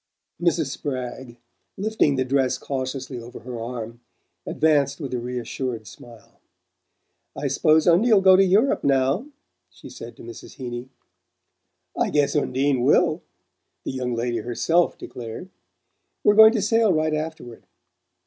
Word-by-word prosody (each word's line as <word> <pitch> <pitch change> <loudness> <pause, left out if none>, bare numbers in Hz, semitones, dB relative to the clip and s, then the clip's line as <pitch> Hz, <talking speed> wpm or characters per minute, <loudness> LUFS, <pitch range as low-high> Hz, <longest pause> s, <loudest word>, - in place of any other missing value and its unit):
Mrs. 165 -5 +1
Spragg, 130 -3 -6 0.4
lifting 205 -8 +1
the 130 0 0
dress 130 -1 +1
cautiously 130 -1 -5
over 120 +1 -11
her 120 -2 -7
arm, 115 -1 -6 0.5
advanced 145 -3 +1
with 140 -5 -5
a 125 - -1
reassured 125 -1 -4
smile. 115 +2 -15 1.0
"I 145 - -3
s'pose 155 +3 +3
Undie'll 205 +5 +5
go 190 -1 +7
to 195 - +5
Europe 200 +8 +2
now," 135 - +1 0.4
she - - -14
said - - -10
to - - -12
Mrs. 360 - -11
Heeny. 120 -1 -7 1.1
"I - - 0
guess 145 -1 +1
Undie 140 -1 +1
WILL!" 125 - +2 0.6
the - - -4
young 125 -2 -3
lady 120 0 -2
herself 125 +10 0
declared. 120 +9 -8 0.7
"We're 210 - +5
going 220 +1 +8
to 220 -5 0
sail 225 0 +3
right 155 -2 +1
afterward. 155 -6 -6
135 Hz, 135 wpm, -23 LUFS, 125-165 Hz, 1.1 s, going